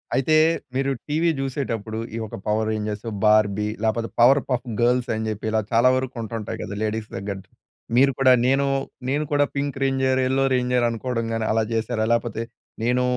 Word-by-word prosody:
అయితే 155 +4 +2 0.4
మీరు 135 +1 +1 0.2
టీవీ 160 +3 +2
జూసేటప్పుడు 115 -5 -3 0.2
ఈ - - -3
ఒక - - -8
పవర్ 110 +1 +1
రేంజర్స్, 105 0 -3 0.2
బార్బీ 105 -1 +3 0.2
లేపోతే 115 +1 0
పవర్ 130 +4 +7
పఫ్ 125 0 -1
గర్ల్స్ 125 +1 +2
ని 110 - -3
జెప్పి 110 0 -4
ఇలా 110 0 +2
చాలా 120 +2 +5
వరకు 130 0 -3
ఉంటుంటాయి 110 -1 -5
గదా! 100 - -5
లేడీస్ 110 0 -3
దగ్గర. 100 0 -4 0.6
మీరు 135 +2 +5
కూడా 130 -1 +6
నేను 135 +2 +3 0.4
నేను 145 +2 +1
కూడా 145 0 +3
పింక్ 140 -1 -2
రేంజర్, 135 -1 +1
యెల్లో 135 +1 +1
రేంజర్ 125 -1 +1
అనుకోవడం 115 0 -3
గాని 115 -1 -1
అలా 110 0 +2
జెశారా? 110 0 -1
లేపోతే 115 -1 -1 0.4
నేను 125 +2 +2
120 Hz, 170 wpm, -23 LUFS, 110-135 Hz, 0.6 s, పవర్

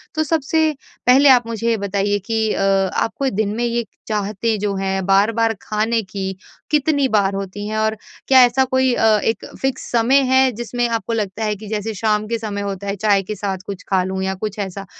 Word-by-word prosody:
तो 315 - +1
सबसे 315 +1 +1 0.4
पहले 270 +3 +6
आप 245 -3 +5
मुझे 230 0 -3
ये 230 - +2
बताइए 200 0 -1
कि 220 -1 +1
अ - - -1 0.4
आपको 270 +4 -2
दिन 215 0 0
में 235 - -2
ये 235 0 -1 0.2
चाहतें 215 +1 -1
जो 205 -1 -1
हैं 190 0 -2
बार-बार 225 +4 +3
खाने 220 +2 0
की 190 0 -4 0.4
कितनी 290 -2 +2
बार 200 -4 +1
होती 195 +1 -5
हैं? 215 0 -3
और 220 0 +1 0.3
क्या 260 -1 +7
ऐसा 245 +2 +2
कोई 260 -1 +2
अ, 225 - +1 0.2
एक 225 -2 -1 0.2
फिक्स 270 -1 -2
समय 245 +4 +4
है 260 0 +5
जिसमें 240 +1 -2
आपको 230 0 -2
लगता 215 -1 -2
है 210 -1 0
कि 210 +1 -11
जैसे 215 +1 -3
शाम 215 0 0
के 230 +1 -1
समय 205 -2 -4
होता 200 0 -5
है, 200 - -1
चाय 205 0 +2
के 215 +3 -5
साथ 195 -1 -3
कुछ 200 -1 -6
खा 190 -2 +2
लूँ? 190 +1 -3
या 190 0 -1
कुछ 210 +2 -5
ऐसा, 195 0 -5
215 Hz, 210 wpm, -19 LUFS, 200-240 Hz, 0.4 s, क्या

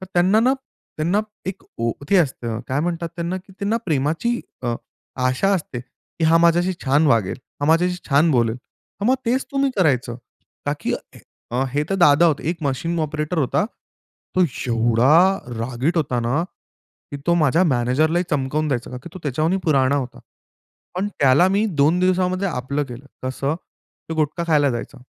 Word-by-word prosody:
तर 190 - -8
त्यांना 185 +5 +4
ना, 250 +3 +4 0.4
त्यांना 170 +7 +1 0.3
एक 190 0 -5 0.2
ओ 115 0 +1 0.2
ते 200 - +5
असतं, 120 -9 0
काय 135 +2 0
म्हणतात 170 +1 -2
त्यांना, 170 +2 -2
की 190 +1 -11
त्यांना 205 +3 0
प्रेमाची 160 - 0 0.2
अ, 120 -1 0 0.5
आशा 130 +10 +1
असते 150 -9 -4 0.4
की, 160 - +3
"हा 160 +1 +5
माझ्याशी 170 +2 +3
छान 145 +3 +3
वागेल, 110 -8 +2 0.2
हा 145 - 0
माझ्याशी 175 +3 +3
छान 150 +3 +4
बोलेल." 115 -5 +2
हां, 200 - -9
मग 260 - +5
तेच 255 +3 +1
तुम्ही 275 0 +2
करायचं. 130 - +1 0.5
का - - +2
की - - -1 0.6
अ, 125 +3 0
हे 145 +2 +1
तर - - +2
दादा 170 -3 +5
होते. 155 -1 0
एक 170 - -4
मशीन 155 +5 -1
ऑपरेटर 155 +2 -2
होता, 150 +7 +1 0.7
तो 185 - +5 0.2
एवढा 125 +11 +4 0.2
रागीट 125 +8 -1
होता 135 -6 0
ना, 120 +7 0 0.7
की 145 - -4
तो 170 - +4
माझ्या 165 +1 +3
मॅनेजरला 145 +4 +2
ही 180 - 0
चमकावून 150 +1 0
द्यायचा, 125 -4 -2
का 125 - -6
की - - -9
तो 185 - -6
त्याच्यावरूनही 155 +6 0
पुराणा 140 -3 +3
होता. 130 -3 -4 0.7
पण, 190 +3 -1
त्याला 145 +6 +5
मी 200 +3 +2 0.2
2 155 +5 +4
दिवसामध्ये 185 +1 +1
आपलं 140 -1 -2
केलं, 130 +1 -10 0.2
कसं? 135 +3 -2
ते 165 -1 -12
गुटखा 155 +2 -1
खायला 150 -4 +3
जायचा. 120 0 -5
155 Hz, 170 wpm, -21 LUFS, 130-180 Hz, 0.7 s, ते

